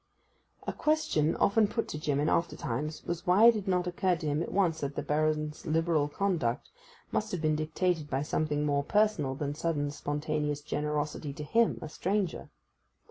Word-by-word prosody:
A -, -, -2 dB
question 300 Hz, -, +1 dB
often 210 Hz, +1 st, +3 dB
put 230 Hz, +3 st, -2 dB
to 150 Hz, -, -4 dB
Jim 145 Hz, -2 st, 0 dB
in 150 Hz, -, +1 dB
after 170 Hz, +1 st, +1 dB
times 150 Hz, +7 st, -4 dB
was 170 Hz, 0 st, -4 dB
why 190 Hz, +5 st, +6 dB
it 235 Hz, -, +9 dB
had 210 Hz, -3 st, -4 dB
not 180 Hz, -1 st, +1 dB
occurred 180 Hz, -1 st, 0 dB
to -, -, -4 dB
him 150 Hz, +1 st, 0 dB
at -, -, -4 dB
once 175 Hz, -5 st, +2 dB
that 140 Hz, 0 st, -3 dB
the -, -, -2 dB
Baron's 155 Hz, +1 st, -1 dB
liberal 160 Hz, -1 st, +2 dB
conduct 150 Hz, -7 st, -1 dB, 0.4 s
must 220 Hz, +1 st, -1 dB
have 180 Hz, -, -2 dB
been 155 Hz, 0 st, +2 dB
dictated 155 Hz, 0 st, -1 dB
by 135 Hz, +1 st, 0 dB
something 150 Hz, -1 st, 0 dB
more 140 Hz, -1 st, +1 dB
personal 205 Hz, -8 st, +1 dB
than 145 Hz, +1 st, -3 dB
sudden 145 Hz, -2 st, -1 dB
spontaneous 150 Hz, 0 st, -2 dB
generosity 150 Hz, 0 st, -2 dB
to 150 Hz, -, -6 dB
him, 230 Hz, +9 st, +2 dB
a -, -, -4 dB
stranger. 185 Hz, +4 st, -2 dB
155 Hz, 185 wpm, -30 LUFS, 150-180 Hz, 0.4 s, it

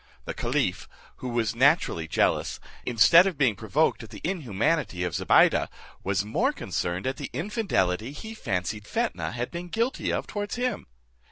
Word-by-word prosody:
The -, -, -4 dB
caliph, -, -, -1 dB, 0.3 s
who 125 Hz, -, -5 dB
was 115 Hz, -2 st, 0 dB
naturally 130 Hz, -, +3 dB
jealous, -, -, +1 dB, 0.3 s
instead 165 Hz, -, +7 dB
of 185 Hz, -6 st, -3 dB
being 130 Hz, -7 st, +3 dB
provoked 125 Hz, +10 st, +1 dB
at 115 Hz, -, -10 dB
the 105 Hz, -1 st, -10 dB
inhumanity 130 Hz, -, 0 dB
of 90 Hz, -2 st, -2 dB
Zobeide, -, -, +4 dB, 0.4 s
was 100 Hz, +1 st, 0 dB
more 105 Hz, -, +1 dB
concerned 90 Hz, +1 st, -3 dB
at 130 Hz, +1 st, -1 dB
the -, -, -5 dB
infidelity 135 Hz, -, 0 dB
he 220 Hz, +10 st, -8 dB
fancied 105 Hz, -, -3 dB
Fetnah 235 Hz, 0 st, -2 dB
had 120 Hz, 0 st, -3 dB
been 175 Hz, +1 st, -5 dB
guilty 230 Hz, +8 st, -1 dB
of -, -, -1 dB
towards 205 Hz, -1 st, -4 dB
him. 250 Hz, 0 st, -2 dB
125 Hz, 160 wpm, -26 LUFS, -, 0.4 s, instead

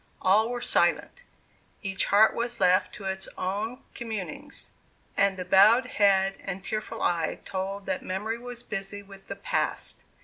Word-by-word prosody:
All 210 Hz, +5 st, +4 dB
were 245 Hz, 0 st, -3 dB
silent -, -, +1 dB, 0.6 s
each 195 Hz, 0 st, 0 dB
heart 210 Hz, +2 st, +5 dB
was 235 Hz, +1 st, -3 dB
left 185 Hz, -1 st, +4 dB
to 205 Hz, -, -10 dB
its 190 Hz, 0 st, -3 dB
own 210 Hz, +7 st, -3 dB
communings, 235 Hz, +5 st, -5 dB, 0.4 s
and 200 Hz, -1 st, +3 dB
the 180 Hz, -, -4 dB
bowed 210 Hz, +7 st, +6 dB
head 195 Hz, -4 st, +3 dB
and 195 Hz, -1 st, -5 dB
tearful 215 Hz, +2 st, -4 dB
eye 170 Hz, -2 st, 0 dB
told 195 Hz, +1 st, -4 dB
that 190 Hz, -1 st, -2 dB
memory 210 Hz, +5 st, -3 dB
was 245 Hz, 0 st, -8 dB
busy 200 Hz, 0 st, -5 dB
with 195 Hz, -1 st, -15 dB
the -, -, -5 dB
Past. -, -, -2 dB
200 Hz, 150 wpm, -27 LUFS, 190-225 Hz, 0.6 s, bowed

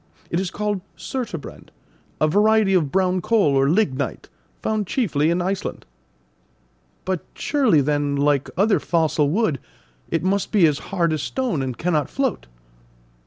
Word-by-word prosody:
It 170 Hz, -, +1 dB
is 190 Hz, -1 st, -2 dB
called 210 Hz, -1 st, -2 dB, 0.2 s
surturbrand, 230 Hz, -, -6 dB, 0.5 s
a 155 Hz, -, +3 dB
variety 210 Hz, +3 st, +3 dB
of 160 Hz, -7 st, +2 dB
brown 185 Hz, -1 st, +1 dB
coal 210 Hz, -7 st, +2 dB
or 135 Hz, +1 st, +3 dB
lignite, 150 Hz, -7 st, -1 dB, 0.3 s
found 215 Hz, -3 st, -1 dB
chiefly 160 Hz, -, +1 dB
in 175 Hz, +1 st, +1 dB
Iceland." 190 Hz, +1 st, -3 dB, 1.2 s
"But 185 Hz, -2 st, -2 dB
surely, 260 Hz, -, +2 dB
then, 145 Hz, 0 st, 0 dB
like 140 Hz, -1 st, +1 dB
other 205 Hz, +2 st, +3 dB
fossil 160 Hz, -3 st, +1 dB
wood, 175 Hz, -, +1 dB, 0.5 s
it 165 Hz, -, -1 dB
must 195 Hz, +1 st, 0 dB
be 200 Hz, -6 st, +5 dB
as 150 Hz, -2 st, +2 dB
hard 170 Hz, -4 st, +1 dB
as 155 Hz, -, -2 dB
stone, 250 Hz, -, -2 dB
and 130 Hz, -3 st, -4 dB
cannot 160 Hz, -4 st, 0 dB
float?" 265 Hz, -, -2 dB
180 Hz, 145 wpm, -22 LUFS, 150-210 Hz, 1.2 s, be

